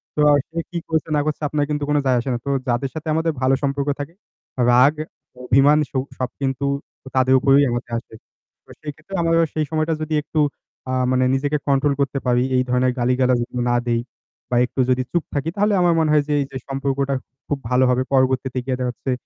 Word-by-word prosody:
তো 150 - +1 0.3
সে 165 +1 -4
কি 175 - -3
করছে 160 0 -1
না - - +3
করছে 155 0 -2
আপনার 150 0 0
কিন্তু 150 -1 -1
কোন 150 - +2
যায় 130 -2 +3
আসে 120 - -4
না। - - 0
তো - - -2 0.2
যাদের 125 +3 0
সাথে 160 0 -6
আমাদের 160 +1 +1
ভালো 130 +1 +3
সম্পর্ক 140 0 -1
থাকে, 145 +3 -6 0.6
রাগ, 125 +4 +6 0.5
অভিমান, 135 +4 +4
সুখ 130 -1 -1
সব 130 0 -1
কিন্তু 135 0 -1 0.4
আ - - -7
তাদের 130 0 +4
উপরেই 140 +2 +5
আমাদের 120 0 -4
আসবে। 115 -1 -9 0.5
তো - - -29
সেইক্ষেত্রে 155 +5 -9
আমরা 165 0 +3
সেই 155 -1 0
সময়টা 155 +1 0
যদি 155 0 -3
একটু 155 - -3 0.5
আ - - -1 0.2
মানে 130 0 +2
নিজেকে 145 +2 0
কন্ট্রোল 140 +1 +2
করতে 140 0 0
পারি, 125 0 +3
এই 125 - +3
ধরনের 125 +1 +2
গালি-গালাজ 125 0 +2 0.3
না 120 - +2
দেই, 115 -1 +1 0.5
বা 125 - 0
একটু 125 - -8
যদি 130 0 +2
চুপ 170 -2 0
থাকি, 145 +2 -1
তাহলে 205 +1 +2
আমার 175 -1 +4
মনে 160 -1 +2
হয় 150 -1 +4
যে 150 - 0
এই - - -1
যে 135 - -5
সম্পর্কটা 135 0 -1 0.3
খুব 145 - -1
ভালো 125 +1 +3
হবে। 125 +1 +2
পরবর্তীতে 130 -1 +1
গিয়ে 130 -1 -1
দেখা 125 -1 -1
যাচ্ছে 130 - -5
135 Hz, 210 wpm, -21 LUFS, 130-150 Hz, 0.6 s, রাগ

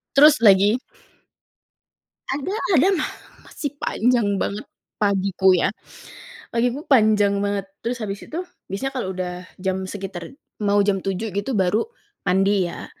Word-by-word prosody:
Terus 300 +2 +7
lagi 200 +3 +6 1.5
ada 290 +8 -2 0.2
ada. 310 +7 +5
Ma - - 0 0.4
masih 290 -3 -5
panjang 230 -7 +1
banget, 200 +2 -3 0.3
pagiku, 195 -2 +3
ya. 180 - +1 0.8
Pagiku, 245 +5 0
panjang 210 -5 +4
banget. 200 -1 -1 0.2
Terus, 240 +2 -2
habis 205 -3 -5
itu, 325 - -6 0.3
biasanya 265 +8 -3
kalau 240 -8 -3
udah 180 -1 -3 0.2
jam, 190 0 -2
sekitar 190 -4 -6 0.3
mau 205 0 +2
jam 195 -2 +1
7.00 195 +1 -3
gitu, 205 +3 -1
baru 190 +4 +2 0.4
mandi, 190 0 +2
ya. - - -7
200 Hz, 130 wpm, -22 LUFS, 190-240 Hz, 1.5 s, Terus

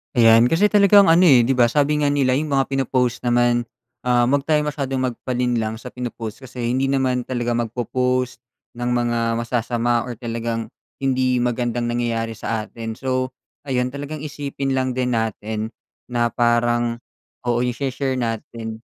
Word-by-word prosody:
Ayan, 115 0 +6
kasi 180 +6 +4
talagang 200 -1 +6
ano, 165 +3 +6
eh, 140 -8 +7
'di 125 +3 +2
ba, 120 -2 +4
sabi 150 +1 +2
nga 145 - +3
nila, 130 -3 +2
yung 150 +1 -2
mga 135 -1 +2
pinopost 130 -3 0
naman, 120 0 +2 0.4
ah, 120 -1 +3
huwag 140 +2 +2
tayong 150 0 +1
masyadong 140 -3 -2
magpalinlang 120 -3 -2
sa 125 - -9
pinopost 120 -1 -6
kasi 125 -2 -5
hindi 130 +3 +1
naman 130 -2 +1
talaga 120 -1 -2
magpo-post 125 +2 -1 0.4
ng 120 +1 -2
mga 120 -1 0
masasama 120 0 0
or 120 -2 -7
talagang 115 -1 -3 0.3
hindi 130 -2 +1
magandang 120 -1 -1
nangyayari 115 -1 -1
sa 110 0 -3
atin. 115 -1 -6
So, 130 +2 -2 0.3
ayon 125 -3 0
talagang 145 +3 -6
isipin 140 -2 -3
lang 130 0 0
din 125 -1 -1
natin 110 0 -3 0.4
na 120 -1 +2
parang 120 0 +1 0.5
oo, 120 0 +2
yung 125 - 0
shini-share 135 +1 -2
natin 115 -1 -4
125 Hz, 155 wpm, -21 LUFS, 120-135 Hz, 0.5 s, eh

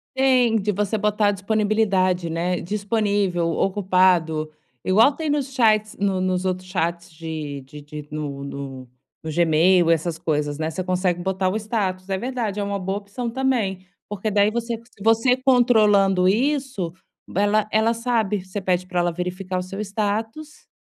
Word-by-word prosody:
Tem, 255 -4 +3
de 210 +1 0
você 210 +2 -1
botar 210 0 +2
disponibilidade, 200 -3 +1
né. 175 +2 -1
"Disponível, 200 -3 0
ocupado", 180 -5 +2 0.3
igual 220 +9 +5
tem 315 +1 -4
nos 280 -2 -1
chats, 215 -4 +2
no 195 -2 0
nos 185 0 0
outros 185 0 -2
chats 170 0 -2
de 155 -3 -6
de 145 +3 -12
de 150 0 -9
no 145 -2 -5
no 135 -2 -7 0.3
no 160 - -4
Gmail, 170 +2 +4
essas 165 0 +1
coisas, 150 -2 -1
né. 160 +1 -2
Você 185 +3 -4
consegue 180 -1 0
botar 190 0 -1
o 190 - -3
status. 200 -4 -2
É 190 - 0
verdade, 235 -3 -3
é - - 0
uma 200 0 -2
boa 195 +2 -2
opção 210 +4 -5
também, 230 -7 -1 0.2
porque 210 +1 -3
daí 205 +1 +3
você 235 0 -2 0.2
você 225 +3 +3
controlando 215 -8 +4
isso, 255 - 0 0.4
ela 205 +2 +2
ela 220 +2 +3
sabe. 225 -5 -1
Você 190 +2 -5
pede 185 -1 0
pra 180 -1 -2
ela 175 -1 +1
verificar 180 +1 -3
o - - -3
seu 195 +2 -8
status, 220 +8 -3
195 Hz, 160 wpm, -22 LUFS, 175-220 Hz, 0.4 s, igual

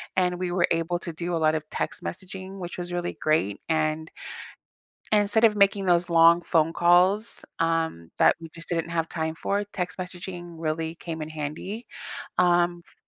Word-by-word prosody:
And 180 -1 +1
we 180 -1 -2
were 175 -1 +2
able 165 +1 0
to 170 - -6
do 170 +1 -3
a - - +1
lot 155 0 +4
of 155 0 -4
text - - -3
messaging, 190 +1 -7
which 175 0 -6
was 175 0 -5
really 175 0 -3
great, 155 -11 +1
and 155 0 0 1.0
and 210 -1 +6
instead 220 +3 +2
of 210 -2 +5
making 200 -1 +3
those 175 0 +3
long 170 +1 +6
phone 165 -1 +2
calls, 180 +6 +3
um, 165 - 0
that - - +5
we 165 - -8
just 165 0 -10
didn't 170 -1 -1
have 165 -1 -1
time 160 -1 -2
for, 200 +4 -1
text 190 -3 -5
messaging 180 -2 -7
really 160 0 -2
came 160 -2 -6
in 155 - -5
handy. 155 +9 -5 0.5
Um, 175 -1 +3
f - - -19
175 Hz, 185 wpm, -26 LUFS, 160-180 Hz, 1.0 s, and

